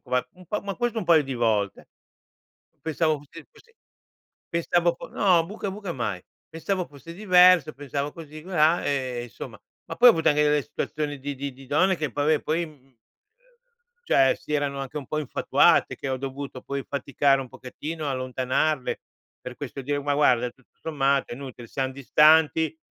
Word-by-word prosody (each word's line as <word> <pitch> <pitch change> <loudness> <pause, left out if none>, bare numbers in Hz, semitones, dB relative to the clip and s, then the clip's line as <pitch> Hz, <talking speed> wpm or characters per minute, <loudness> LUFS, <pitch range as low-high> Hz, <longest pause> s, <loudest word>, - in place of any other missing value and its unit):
ma 125 0 0 0.4
ma 200 -1 -4
questo 240 -2 -1
un 200 - -3
paio 160 -4 +5
di 135 - -4
volte 110 -4 0 1.0
"pensavo 160 -1 +1
fossi 145 +2 -13
fossi 470 +1 -22 0.8
pensavo 170 +1 +1
po" - - -9
no, 175 -4 +3
buca, 200 0 -5
buca 195 -3 -6
mai. 105 - -3 0.3
"Pensavo 180 +2 -2
fossi 145 +3 -12
diverso, 180 -5 +5
pensavo 145 +1 -4
così 155 -1 -11
e - - -14
colà" 170 -2 +2
e, 130 -4 -2
insomma. 120 - -9 0.3
Ma - - -6
poi 245 +1 +8
ho - - +9
avuto 165 -7 0
anche 150 0 +3
delle 150 0 +3
situazioni 145 +4 -4
di 140 +1 -4
di 140 0 -5
di 135 +1 -14
donne 185 +7 +3
che, 155 -3 -3
vabbè, 145 +4 +1
poi, 165 +2 -1
mhmm, 155 - -13
uhm, 135 - -30 1.1
cioè, 135 - +4
si 150 - -7
erano 145 -1 -1
anche 135 +2 -5
un 140 -4 -7
po' 155 - -2
infatuate, 145 - +3
che 135 - -5
ho 130 - -1
dovuto 135 0 -6
poi 140 -1 -4
faticare 140 0 +1
un 130 - -8
pochettino 155 +6 -7
a - - 0
allontanarle. 130 +2 -1 0.4
Per 125 0 -8
questo 140 0 -6
dire: 145 +2 -2
“Ma, 145 0 0
guarda, 125 -4 +3
tutto 125 +1 -27
sommato 140 -3 0
è - - -4
inutile, 130 -3 -9
siam 130 +2 -2
distanti, 155 +3 +4
145 Hz, 180 wpm, -25 LUFS, 135-165 Hz, 1.1 s, ho